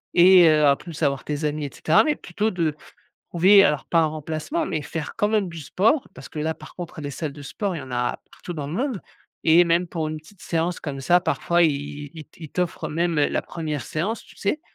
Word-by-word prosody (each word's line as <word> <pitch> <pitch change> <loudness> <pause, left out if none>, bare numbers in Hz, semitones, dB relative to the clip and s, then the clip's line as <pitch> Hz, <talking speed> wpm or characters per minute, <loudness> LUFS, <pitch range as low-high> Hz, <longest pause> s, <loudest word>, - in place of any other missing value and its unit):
et 180 0 +8
heu, 155 -1 +4
en 140 - +5
plus 165 +1 -10
avoir 140 -2 +1
tes 150 +1 -4
amis, 150 0 -2
et - - -4
cetera, 160 - +4
mais 305 -1 +1
plutôt 205 +2 -2
de, 165 -5 -1 0.6
trouver, 190 +4 +6
alors 150 -5 +1
pas 170 - +1
un 165 - +4
remplacement, 155 - -3
mais 160 - -2
faire 155 +1 -5
quand 210 -2 +2
même 210 -3 +1
du 165 - -8
sport. 215 - +1
Parce - - -11
que - - -7
là, 160 +1 -1
par 155 - -13
contre, 175 -2 -7
les 145 - -4
salles 150 +1 -4
de 145 - -10
sport, 195 +7 -3
il - - -5
y - - -8
en 130 - -11
a 125 0 -1
partout 175 - -8
dans 150 -3 -4
le - - -6
monde 250 -2 -2 0.4
et 165 +2 +6
même 170 +1 +2
pour 160 -2 -3
une 155 - -4
petite 180 +6 -19
séance 170 +1 -1
comme 140 -2 -5
ça, 175 +6 +4
parfois, 175 -1 +1
ils 145 -1 -2
ils 160 -2 -9
t 160 +2 -14
ils - - -8
t'offrent 170 -1 -2
même 170 +2 0
la 145 - +1
première 155 -5 -4
séance 195 - -3
tu - - -18
sais? 205 +10 -1
165 Hz, 245 wpm, -23 LUFS, 150-180 Hz, 0.6 s, et